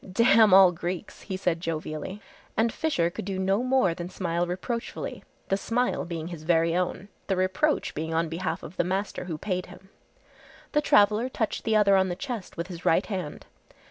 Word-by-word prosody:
"Damn 225 +1 +5
all 190 -1 +8
Greeks," 175 +3 -5
he 190 -2 -5
said 180 -3 0
jovially, 160 +4 -4 0.4
and 225 0 +2
Fisher 175 - 0
could - - -6
do 190 0 -3
no 195 +3 +1
more 255 -8 +2
than 175 +1 -6
smile 175 -2 -1
reproachfully, 230 - -4 0.3
the 195 - +2
smile 245 +5 0
being 170 -1 -5
his 170 -3 -7
very 165 +1 +2
own, 180 +1 -1 0.2
the 195 - +1
reproach 185 +11 +1
being 160 +2 -4
on 165 +1 +1
behalf 165 +1 -3
of 165 - -10
the - - +3
master 190 +1 -2
who 165 -4 -4
paid 185 +1 -3
him. 190 - -14 0.8
The 295 - +2
traveller 215 -1 +4
touched 220 -4 -2
the 220 - +2
other 200 -2 +5
on 190 -1 +3
the 175 - -2
chest 240 -3 -6
with 170 - -2
his 175 -1 -9
right 165 - +3
hand. 185 -8 -5
185 Hz, 190 wpm, -27 LUFS, 170-210 Hz, 0.8 s, all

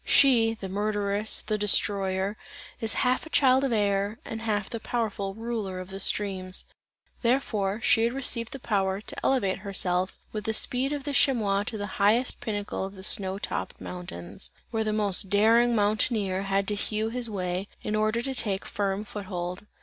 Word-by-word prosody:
She, 235 -5 +5
the 200 -3 -6
murderess, 205 +1 0
the 215 -1 -2
destroyer, 195 -1 +1 0.4
is 225 -2 +1
half 255 +5 +1
a - - -12
child 265 -3 +4
of 270 - +1
air 205 -1 +1
and 225 0 -5
half 210 -3 -1
the 230 - -5
powerful 210 -4 -2
ruler 220 -5 -4
of 185 +1 -8
the 195 - -6
streams; 190 -2 +3 0.6
therefore, 225 -5 0
she 225 -2 +4
had 235 - +1
received 240 -4 +1
the - - -5
power, 195 -6 0
to 210 - -7
elevate 200 -8 +1
herself 185 -2 0
with 210 -2 -5
the 220 - 0
speed 260 +3 +1
of 290 -2 -3
the 285 0 -3
chamois 215 -8 +3
to 220 - -3
the 205 - -3 0.2
highest 225 +5 +3
pinnacle 205 -3 -3
of 195 +1 -6
the 190 - -11
snow 190 -1 +1
topped - - -4
mountain; 175 - -8 0.3
where 225 -1 0
the 215 - -1
most 205 -3 0
daring 230 +4 +4
mountaineer 205 -2 +1
had 195 0 +1
to - - 0
hew 215 +1 -1
his 240 0 -3
way, 185 -1 -3 0.2
in 210 - -1
order 215 +2 +1
to 270 - -2
take 205 -6 -1
firm 200 -2 -2
foot 205 -1 -7
hold. 180 +1 -5
210 Hz, 180 wpm, -27 LUFS, 195-230 Hz, 0.6 s, She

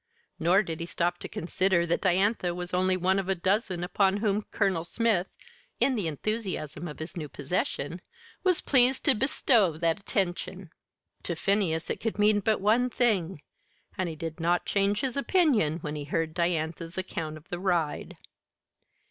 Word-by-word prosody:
Nor 180 +5 +4
did 165 -3 -5
he 170 - -4
stop 175 +1 -1
to - - -6
consider 180 0 +1
that 170 - 0
Diantha 185 -1 +2
was 175 0 -6
only 185 +1 +2
one 185 +2 +2
of 195 -1 -4
a 195 - +2
dozen 185 0 0
upon 195 +2 +2
whom 205 -1 +1
Colonel 190 -6 +1
Smith, 200 0 +1 0.5
in 270 - +3
the 205 -8 -1
enthusiasm 175 -2 -3
of 150 - -8
his 160 +2 -7
new 155 -4 -5
possession, 145 +2 -3 0.4
was 365 -3 +2
pleased 260 -1 +3
to 280 - +6
bestow 220 - +2
that 165 +2 +1
attention. 185 -2 -3 0.5
To 170 - -3
Phineas 175 -3 0
it - - -4
could 225 -2 -2
mean 210 0 +4
but 215 +2 +1
one 225 +5 +3
thing; 190 - 0 0.5
and 185 -3 -1
he 160 - -6
did 160 +1 -6
not 175 +2 +1
change 200 +1 +1
his 260 -3 -2
opinion 280 - +2
when 150 -2 -4
he 145 -1 -5
heard 160 +1 -1
Diantha's 165 0 -2
account 165 -4 -4
of 155 - -16
the 175 - -4
ride. 175 -5 -1
180 Hz, 170 wpm, -28 LUFS, 165-205 Hz, 0.5 s, to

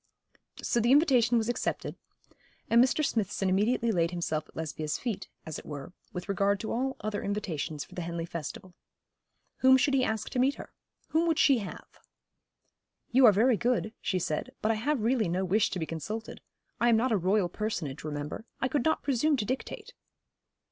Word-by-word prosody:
So 235 - +1
the 235 +2 +3
invitation 255 -5 +5
was 225 -1 0
accepted, 240 - -2 0.8
and 235 +1 +7
Mr. 280 +4 +1
Smithson 200 -5 0
immediately 225 +5 +2
laid 170 -4 +2
himself 165 -3 -3
at - - -21
Lesbia's 155 -1 -3
feet, 220 -6 -4 0.2
as 160 - -5
it - - -14
were, 145 +3 -7 0.2
with 180 +1 -6
regard 200 0 +1
to 220 - -4
all 265 +3 -1
other 210 -1 -2
invitations 170 -7 -3
for - - -17
the 180 - -4
Henley 170 0 -3
festival. 170 +2 -7 0.8
Whom 260 0 +6
should 275 +1 +2
he 265 -1 +3
ask 220 -3 -2
to 250 - -1
meet 270 +3 +3
her? - - -11 0.4
whom 330 +2 +2
would 325 -2 +2
she 275 -6 +5
have? 200 - -7 1.3
'You 255 0 +7
are - - +9
very 225 +4 +3
good,' 235 -2 0
she 185 - 0
said, 155 -3 -2
'but 215 - +1
I - - +1
have 285 0 0
really 230 -5 +2
no 185 +3 0
wish 205 +4 +2
to - - -4
be 165 - -2
consulted. 210 +8 -6 0.4
I 240 - +4
am 230 - +5
not 250 +3 +1
a - - +4
royal 190 +1 +2
personage, 175 -8 -4
remember. 150 +7 -5
I 265 - +1
could 285 -3 0
not 315 - +1
presume 285 +2 +2
to 215 - -1
dictate.' 425 - -5
215 Hz, 190 wpm, -29 LUFS, 175-250 Hz, 1.3 s, are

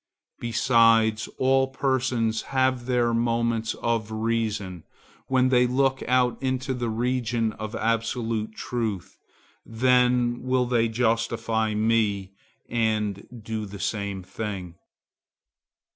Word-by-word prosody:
Besides, 115 -2 +3
all 135 0 +3
persons 130 -4 0 0.2
have 130 -2 +1
their 120 -2 +2
moments 115 -1 0
of 115 -2 -2
reason, 110 -5 -2 0.4
when 130 -1 +3
they 125 -1 +4
look 135 +1 +1
out 125 -1 +2
into 130 0 -1
the 120 -2 -2
region 115 -1 -1
of 110 0 -6
absolute 115 -1 -1
truth; 110 -7 -4 0.5
then 125 0 +2
will 130 -1 +1
they 120 -2 +1
justify 115 -1 0
me 105 -3 +1 0.4
and 110 -4 -1 0.2
do 110 -1 -4
the 100 0 -9
same 100 -2 -3
thing. 95 -3 -5
115 Hz, 105 wpm, -25 LUFS, 110-125 Hz, 0.5 s, they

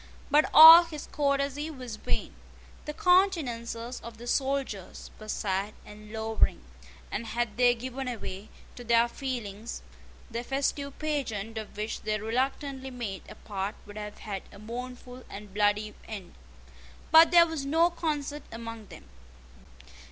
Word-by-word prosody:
But 300 +1 +4
all 325 +2 +11
his 310 -3 -7
courtesy 280 +1 0
was 255 -7 -7
vain. - - -2 0.5
The 300 - -4
countenances 255 -11 +1
of 235 -1 -9
the 235 - -10
soldiers 265 -7 -2
were 215 - -10
sad 200 0 -2
and 210 0 -12
lowering; 220 - 0 0.5
and 230 +2 -3
had 235 0 -2
they 245 0 +4
given 255 +2 -5
way 195 +3 -7 0.3
to 245 - -9
their 235 0 +4
feelings, 235 -4 -5 0.5
the 235 +1 -3
festive 280 +1 -2
pageant 225 -8 -3
of 215 -1 -10
which 215 +1 -3
they 215 0 -1
reluctantly 265 +4 -2
made 235 -7 -5
a - - -10
part 200 -1 -4
would 205 0 -11
have 210 0 -7
had 200 -3 -5
a - - -13
mournful 250 +3 -8
and 205 -1 -10
bloody 210 +1 +1
end. 200 -5 -8 0.8
But 320 0 +9
there 340 0 +7
was 320 -4 -4
no 325 +5 +3
concert 300 -3 -3
among 230 -2 -8
them. 65 - -13
240 Hz, 145 wpm, -28 LUFS, 215-280 Hz, 0.8 s, all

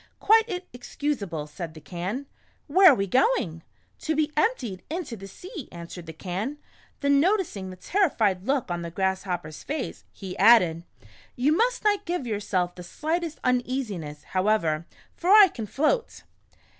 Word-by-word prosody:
"Quite 440 -4 +3
excusable," 240 - -3
said 160 +1 -7
the - - -9
Can. 185 - -5 0.2
" - - -38
Where 370 +4 +8
are - - +4
we 195 - 0
going? 200 - +1
" - - -39
" - - -41
To 315 - -1
be 305 0 +1
emptied 255 - 0
into 320 -7 -4
the 195 -2 -10
sea," 355 - -9
answered 170 0 -9
the - - -5
Can. 190 - -4 0.4
Then 280 -1 +4
noticing 330 - 0
the 185 - -8
terrified 210 - +1
look 270 -8 0
on 175 0 -2
the 170 - -5
Grasshopper's 180 -3 -2
face, 295 -1 -4
he 190 -3 -8
added: 175 -8 +5 0.3
" - - -24
You 285 +5 +2
must - - +1
not 410 -1 +2
give 345 -6 -2
yourself 200 -5 -1
the 180 - -10
slightest 320 - -3
uneasiness, 240 - -2
however, 185 -5 0 0.3
for 355 - -2
I 415 0 +9
can 225 -8 -6
float." 315 - 0
230 Hz, 165 wpm, -26 LUFS, -, 0.4 s, I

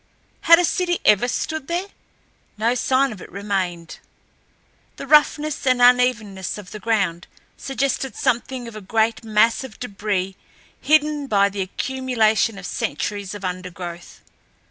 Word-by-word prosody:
Had 335 - +10
a 355 - +3
city 350 +1 0
ever 210 +3 +5
stood 315 +3 -3
there, 345 +3 -1 0.7
no 225 +3 +1
sign 260 +2 +1
of 205 -4 -9
it - - -11
remained. 185 -4 -3 1.0
The - - -7
roughness 300 0 +3
and 255 -1 +3
unevenness 245 -7 +2
of 200 -3 -11
the 215 - -7
ground 195 -6 -1 0.3
suggested 270 -2 -2
something 245 +1 -1
of 230 - -10
a 215 - -7
great 220 +3 0
mass 225 +3 +2
of 260 -5 -11
debris 200 -4 -3 0.5
hidden 300 -1 +2
by 200 -4 +3
the 200 0 -4
accumulation 225 0 0
of 195 - -8
centuries 205 -2 -3
of 200 -2 -7
undergrowth. 180 -1 -7
225 Hz, 140 wpm, -22 LUFS, 195-265 Hz, 1.0 s, Had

